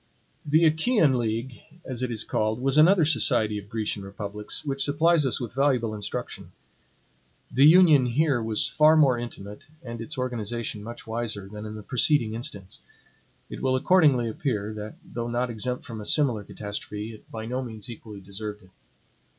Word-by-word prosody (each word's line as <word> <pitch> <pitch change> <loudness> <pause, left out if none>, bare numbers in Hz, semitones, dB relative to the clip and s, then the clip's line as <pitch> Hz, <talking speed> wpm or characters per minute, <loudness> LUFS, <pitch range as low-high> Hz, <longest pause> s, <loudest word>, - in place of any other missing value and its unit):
The 155 +3 +3
Achaean 160 - +3
league, 115 +2 -3 0.3
as 130 -2 -4
it 125 - -1
is 110 -2 0
called, 110 +1 -1
was 135 +1 0
another 165 +2 +6
society 110 -8 +2
of 100 0 -13
Grecian 110 -3 -2
republics, 100 +4 -5
which 135 -1 0
supplies 155 +1 +3
us 130 - 0
with 120 -3 -6
valuable 130 -5 +1
instruction. 105 -2 -6 1.0
The 135 +4 +6
Union 155 -6 +6
here 135 0 +1
was 110 -1 +1
far 155 +1 +5
more 140 -5 +5
intimate, 105 -4 -8 0.2
and 115 -2 -7
its 115 - -7
organization 120 -3 -3
much 115 +3 -9
wiser, 110 -3 -3
than 105 +1 -8
in 105 - -7
the 105 - -8
preceding 125 -1 +2
instance. 110 -6 -6 0.7
It - - -8
will 130 -1 +1
accordingly 140 -5 +4
appear, 110 -3 -2
that 105 0 -7
though 120 0 -5
not 120 +1 -1
exempt 125 +3 -4
from 110 -2 -7
a - - -8
similar 125 -9 +2
catastrophe, 105 +2 -6
it 110 - -16
by 110 -1 -6
no 125 +3 -3
means 110 -5 -8
equally 110 -4 -10
deserved 105 +2 -7
it. 95 - -21
120 Hz, 170 wpm, -26 LUFS, 110-135 Hz, 1.0 s, another